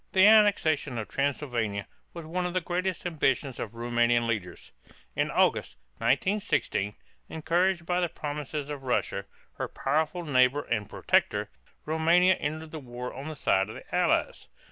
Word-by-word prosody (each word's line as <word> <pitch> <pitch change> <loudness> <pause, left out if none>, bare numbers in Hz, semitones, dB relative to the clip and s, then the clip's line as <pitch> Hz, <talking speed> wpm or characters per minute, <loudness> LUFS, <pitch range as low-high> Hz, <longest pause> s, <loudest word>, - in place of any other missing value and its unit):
The 190 0 +6
annexation 200 - +4
of 110 - -4
Transylvania 120 -8 -1 0.3
was 170 -2 -8
one 180 +3 -2
of 180 - -6
the - - +3
greatest 180 +1 -2
ambitions 135 -6 0
of 115 0 -5
Roumanian 120 0 +2
leaders. 105 -6 -4 0.4
In - - +1
August, - - +1 0.2
1916, 190 - 0 0.3
encouraged 170 +2 0
by 180 +1 +1
the 175 -1 0
promises 150 -1 -5
of 145 -2 -5
Russia, 125 -6 -1 0.3
her - - -2
powerful 155 +5 -1
neighbor 135 0 +3
and 105 -2 -2
protector, - - +1 0.3
Roumania 170 +4 +4
entered 155 +1 -4
the 160 - -6
war 125 -2 -7
on 135 +3 -7
the 155 - -5
side 95 -7 +1
of - - -8
the - - -8
Allies. - - +1
150 Hz, 150 wpm, -28 LUFS, 120-175 Hz, 0.4 s, The